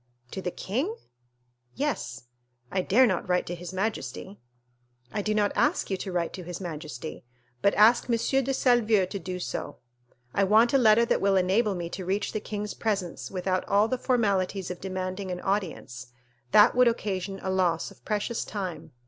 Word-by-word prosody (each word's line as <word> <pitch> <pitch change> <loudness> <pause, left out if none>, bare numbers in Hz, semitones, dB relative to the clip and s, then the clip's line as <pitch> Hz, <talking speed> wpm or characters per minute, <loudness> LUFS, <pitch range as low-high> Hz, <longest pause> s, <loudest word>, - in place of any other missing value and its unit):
"To 190 - -5
the 180 - -2
king?" 260 - -2 0.8
"Yes." 235 - -3 0.5
"I 190 - +1
dare 235 +8 +5
not 185 -5 -1
write 180 0 +2
to 175 - -4
his 175 0 -7
majesty." 135 - -4 0.7
"I 210 - -1
do 215 +1 -1
not 205 -1 +2
ask 295 - +1
you 190 - 0
to 190 - -5
write 175 -2 -1
to 185 - -7
his 175 0 -6
majesty, 155 -5 -6 0.4
but 200 - +3
ask 225 +3 +6
M. 235 - +3
de 270 +3 +1
Salvieux 235 -6 +3
to 195 +2 -5
do 180 +1 -5
so. - - -5 0.6
I 200 - +2
want 220 +5 +5
a 275 - +5
letter 230 -1 +5
that - - +1
will 195 0 +3
enable 195 +3 +2
me 175 -1 -4
to 190 - -5
reach 195 +3 -1
the 215 - -2
king's 210 0 -5
presence 200 -6 -2
without 185 0 -1
all 205 +2 +4
the 255 +1 -2
formalities 200 -7 0
of 180 - -7
demanding 185 0 -4
an 180 -1 -3
audience; 180 - -3 0.4
that 210 +3 +7
would 250 0 +5
occasion 195 -4 -2
a 190 - -1
loss 175 -3 +1
of - - -19
precious 215 +2 -1
time." 190 -5 -6
195 Hz, 180 wpm, -27 LUFS, 180-220 Hz, 0.8 s, that